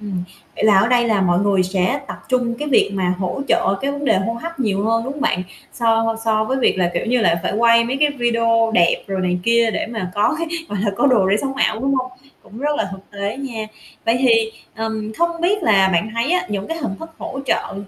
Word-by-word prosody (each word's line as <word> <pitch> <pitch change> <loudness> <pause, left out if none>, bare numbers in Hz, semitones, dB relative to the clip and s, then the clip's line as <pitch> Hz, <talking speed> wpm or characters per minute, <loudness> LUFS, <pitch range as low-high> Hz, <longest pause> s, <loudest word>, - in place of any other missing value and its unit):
Ừm, 195 -4 -4 0.3
vậy - - -2
là 210 -3 +6
ở 220 - +3
đây 240 -1 +3
là 210 -3 +2
mọi 175 -2 +2
người 200 -2 +2
sẽ 185 +8 0
tập - - -6
trung 245 -2 0
cái 295 - -3
việc 255 - +3
mà 185 -1 0
hỗ 190 +8 -3
trợ 195 - +2
cái 280 - -1
vấn 285 +1 -5
đề 220 -7 +3
hô 195 +4 -1
hấp 305 +6 -7
nhiều 200 -4 0
hơn, 230 +1 +1
đúng 265 - -4
hông 290 - -9
bạn? 185 -11 +1 0.3
So 225 -1 +1
so 220 -1 +2
với 260 +5 -1
việc 255 - +2
là, 175 -2 +2
kiểu 175 - -1
như 245 +1 +2
là, 170 -5 +2
phải - - -1
quay 230 +2 +4
mấy 250 +3 -2
cái 295 +1 +3
video 230 -3 +1
đẹp 170 -3 +3
rồi 195 -1 -2
này 180 -1 0
kia 230 +2 +3
để - - -2
mà 215 -6 -5
có 205 +8 +2
cái, 335 - -2 0.2
gọi 205 - -3
là, 205 - +1
có 285 - +2
đồ 220 -8 +3
để 200 - +3
sống 270 -1 -3
ảo, 220 -5 0
đúng 275 +2 +1
hông? 255 -1 -2 0.3
Cũng 215 - -13
rất 295 +2 -1
là 215 -3 -1
thực 195 0 -11
tế 200 +2 -3
nha. 240 -6 -5 0.4
Vậy 230 +1 +2
thì, 225 -4 +3 0.2
ờ, 225 0 -3 0.3
không 340 0 0
biết 380 +3 +1
là 195 -7 +4
bạn 175 +6 +1
thấy 230 +6 0
á 360 -5 +1
những 200 -2 -3
cái 325 - -3
hình 290 -11 -3
thức 325 - -8
hỗ 270 - -6
trợ - - -1
225 Hz, 260 wpm, -19 LUFS, 200-260 Hz, 0.4 s, là